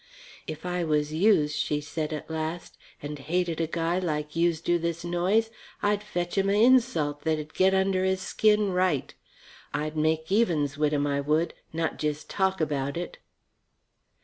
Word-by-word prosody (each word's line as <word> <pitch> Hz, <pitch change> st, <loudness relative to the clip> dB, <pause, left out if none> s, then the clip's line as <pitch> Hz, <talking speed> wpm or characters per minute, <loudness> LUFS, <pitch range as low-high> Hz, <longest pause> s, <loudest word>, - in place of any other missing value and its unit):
"If 155 Hz, +2 st, -6 dB
I 180 Hz, -1 st, -1 dB
was 150 Hz, -1 st, 0 dB
youse," 160 Hz, -4 st, +3 dB
she 150 Hz, -1 st, 0 dB
said 150 Hz, +1 st, -4 dB
at 155 Hz, -, -5 dB
last, 160 Hz, +1 st, -4 dB, 0.3 s
"and 145 Hz, 0 st, -5 dB
hated 165 Hz, +3 st, -1 dB
a 165 Hz, -, 0 dB
guy 165 Hz, +2 st, 0 dB
like 150 Hz, -4 st, -3 dB
youse 170 Hz, -1 st, +2 dB
do 175 Hz, +1 st, +1 dB
this 170 Hz, 0 st, -3 dB
Noyes, 190 Hz, +6 st, +1 dB, 0.3 s
I'd 205 Hz, 0 st, +2 dB
fetch 180 Hz, -3 st, -2 dB
'im 195 Hz, 0 st, +2 dB
a -, -, +3 dB
insult 225 Hz, -, +3 dB
that'd 155 Hz, 0 st, -2 dB
get 190 Hz, +1 st, +3 dB
under 190 Hz, -1 st, +2 dB
his 190 Hz, 0 st, +1 dB
skin 210 Hz, -1 st, +2 dB
right. 180 Hz, -6 st, 0 dB, 0.6 s
I'd 155 Hz, +1 st, -2 dB
make 160 Hz, +2 st, 0 dB
evens 165 Hz, -, +2 dB
wit' 150 Hz, 0 st, +1 dB
'im, 145 Hz, -1 st, +1 dB
I 140 Hz, 0 st, 0 dB
would, 155 Hz, +4 st, +1 dB, 0.2 s
not 165 Hz, 0 st, -2 dB
jes' 150 Hz, 0 st, -1 dB
talk 190 Hz, -1 st, 0 dB
about 140 Hz, -2 st, -1 dB
it." 175 Hz, -, -5 dB
165 Hz, 170 wpm, -27 LUFS, 150-185 Hz, 0.6 s, youse